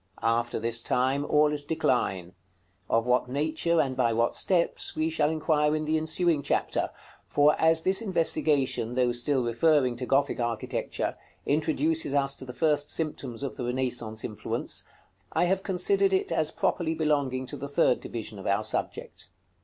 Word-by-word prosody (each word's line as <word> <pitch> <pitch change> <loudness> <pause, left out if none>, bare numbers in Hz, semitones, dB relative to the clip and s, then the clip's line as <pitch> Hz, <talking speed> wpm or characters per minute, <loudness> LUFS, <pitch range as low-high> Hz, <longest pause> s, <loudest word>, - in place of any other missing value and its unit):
After 115 +1 0
this 115 +1 -2
time, 130 +4 0
all 150 0 +3
is 145 -1 -4
decline, 95 - -1 0.6
of 115 0 +2
what 125 0 +1
nature 160 +4 0
and 135 -4 0
by 120 -3 +1
what 115 +1 +1
steps, 175 -3 0
we 160 +1 0
shall 155 -2 +1
inquire 155 -1 +1
in 155 0 -2
the 155 +1 0
ensuing 160 0 +1
chapter; - - -1 0.4
for 145 +1 +4
as 160 0 +3
this 190 +3 +3
investigation, 150 - +1
though 125 -1 +2
still 125 +2 +1
referring 125 +2 +2
to 125 0 -5
Gothic 140 -1 +1
architecture, 120 -2 -3 0.3
introduces 155 0 0
us 140 -1 +2
to - - -8
the 125 - -7
first 150 +1 0
symptoms 140 -6 -3
of 140 - -5
the 125 - -3
Renaissance 120 -3 -2
influence, 105 - -3 0.5
I - - +2
have 190 +2 +1
considered 390 - +2
it 385 +1 +1
as 155 -1 +1
properly 160 0 -1
belonging 145 -5 0
to - - -7
the 140 - -6
third 140 - +2
division 110 -3 -7
of 95 - -7
our 100 +2 +1
subject. - - -4
145 Hz, 165 wpm, -27 LUFS, 125-160 Hz, 0.6 s, for